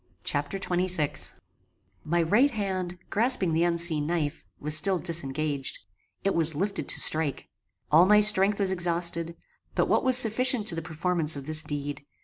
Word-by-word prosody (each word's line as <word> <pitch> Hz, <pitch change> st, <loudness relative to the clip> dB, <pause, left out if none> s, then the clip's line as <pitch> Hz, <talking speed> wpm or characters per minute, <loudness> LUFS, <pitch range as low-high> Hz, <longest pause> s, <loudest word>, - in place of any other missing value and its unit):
Chapter 145 Hz, +5 st, -3 dB
XXVI 180 Hz, -5 st, -2 dB, 0.7 s
My 170 Hz, +2 st, -1 dB
right 215 Hz, -, +2 dB
hand, 190 Hz, -6 st, -5 dB
grasping 220 Hz, -6 st, +1 dB
the 165 Hz, +1 st, +1 dB
unseen 170 Hz, -3 st, -1 dB
knife, 165 Hz, -2 st, -3 dB, 0.2 s
was 150 Hz, +1 st, 0 dB
still 190 Hz, +4 st, +5 dB
disengaged. 155 Hz, -4 st, -3 dB, 0.5 s
It 195 Hz, -, 0 dB
was 160 Hz, -2 st, +3 dB
lifted 195 Hz, +6 st, -4 dB
to -, -, 0 dB
strike. 155 Hz, -3 st, +1 dB, 0.4 s
All 165 Hz, +4 st, +5 dB
my 210 Hz, +1 st, +5 dB
strength 205 Hz, -1 st, +4 dB
was 195 Hz, -2 st, +1 dB
exhausted, 170 Hz, -2 st, 0 dB, 0.4 s
but -, -, 0 dB
what -, -, 0 dB
was 260 Hz, -1 st, +8 dB
sufficient 250 Hz, 0 st, +3 dB
to -, -, -1 dB
the 165 Hz, -, -5 dB
performance 160 Hz, -1 st, -1 dB
of 140 Hz, -1 st, -9 dB
this 155 Hz, +1 st, -1 dB
deed. 145 Hz, -2 st, -6 dB
170 Hz, 155 wpm, -25 LUFS, 155-195 Hz, 0.7 s, was